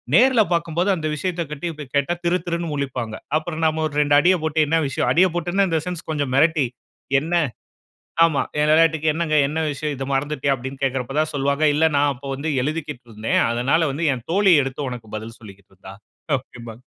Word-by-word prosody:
நேர்ல 255 -1 +5
பாக்கும்போது, 170 +2 0
அந்த 155 -2 -3
விஷயத்தை 170 +1 -2
பத்தி 150 -1 -5
கேட்டா, 140 +5 +1
திருதிருன்னு 170 -2 -1
முழிப்பாங்க. 130 -6 -3 0.2
அப்புறம் 160 0 -4
நாம 155 0 -1
ஒரு, 145 - -11
2 145 0 +4
அடிய 185 +1 +4
போட்டு, 160 0 +1
என்ன 165 - +3
விஷயம், 125 -2 0
அடிய 185 +3 +5
போட்டு 175 +3 0
இன் 165 - -1
த 155 - -1
சென்ஸ் 175 -3 -6
கொஞ்சம் 145 -4 -2
மிரட்டி, 155 -3 +3 0.5
என்ன? 170 +3 -2 0.9
ஆமா 155 -4 +2 0.2
என் 150 - +2
விளையாட்டுக்கு 160 0 +3
என்னங்க 160 -1 -1
என்ன 155 +2 -3
விஷயம், 145 +1 -3
இத 135 - -4
மறந்துட்டியா, 140 0 0
அப்டின்னு 130 +2 -8
கேக்குறப்ப 135 -1 -2
தான், 155 - 0
சொல்வாங்க. 140 +2 0
இல்ல, 160 +2 +2
நான் 145 0 +3
அப்போ 135 +2 -10
வந்து 145 +4 -4
எழுதிகிட்ருந்தேன். 125 -8 -2
அதனால 135 +7 +1
வந்து, 160 +5 -3
என் 120 -2 -9
தோழி 195 0 +4
எடுத்து 135 +1 -4
உனக்கு 120 -3 -8
பதில் 110 +2 -8
சொல்லிக்கிட்டிருந்தா! 95 -2 -14 0.4
அப்டிம்பாங்க. 120 -2 -12
150 Hz, 175 wpm, -22 LUFS, 130-165 Hz, 0.9 s, நேர்ல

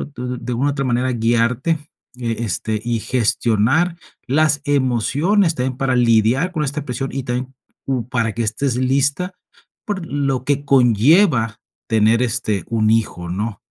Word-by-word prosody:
d 125 0 -4
de 125 - -5
alguna 135 +5 +1
otra 140 -1 -2
manera 125 +1 0
guiarte, 120 +7 +1 0.4
e 115 -1 -3
este, 110 +2 -2
y 120 -2 0
gestionar 125 +8 +1 0.3
las 145 +2 +2
emociones 145 - +1
también 125 0 -2
para 130 -1 0
lidiar 120 - +3
con 160 -4 -2
esta 140 +1 -3
presión 130 +2 -3
y 135 -1 -3
también, 130 +1 -4 0.3
uh, 125 -4 -2
para 115 -4 0
que 115 - -2
estés 115 +4 -1
lista 140 +8 +1 0.5
por 190 -5 -3
lo 135 -3 -1
que 145 0 0
conlleva 125 - +3 0.3
tener, 110 +1 +3
este, 110 -6 -1
un 110 -2 +1
hijo, 105 -6 0
¿no?, 100 +3 -3
125 Hz, 150 wpm, -19 LUFS, 115-140 Hz, 0.5 s, lidiar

